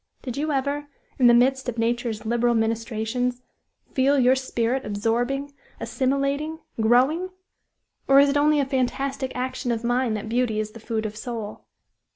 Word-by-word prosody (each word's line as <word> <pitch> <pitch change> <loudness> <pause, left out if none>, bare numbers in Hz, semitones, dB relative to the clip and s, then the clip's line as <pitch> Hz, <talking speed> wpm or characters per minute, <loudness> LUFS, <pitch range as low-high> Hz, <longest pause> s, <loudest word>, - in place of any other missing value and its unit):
Did 250 -3 -5
you 300 +2 -1
ever, 285 +1 -1 0.3
in 250 - +6
the 240 - +7
midst 260 +1 +2
of 240 - -5
nature's 230 -1 -1
liberal 240 +1 +2
ministrations, 230 +2 -1 0.5
feel 275 +2 +3
your 255 0 +5
spirit 260 -1 -1
absorbing, 245 +7 -1 0.3
assimilating, 275 +3 -1 0.2
growing? 260 +11 +3 0.8
Or 275 0 +7
is 280 0 +6
it 280 - 0
only 300 +1 +4
a 280 - +2
fantastic 265 0 -1
action 250 0 -2
of 230 0 -2
mine 245 -1 +1
that 210 - -5
beauty 230 -1 0
is 215 0 -3
the 230 - -11
food 220 0 -3
of 215 0 -4
soul?" 225 -2 -6
250 Hz, 160 wpm, -24 LUFS, 230-275 Hz, 0.8 s, the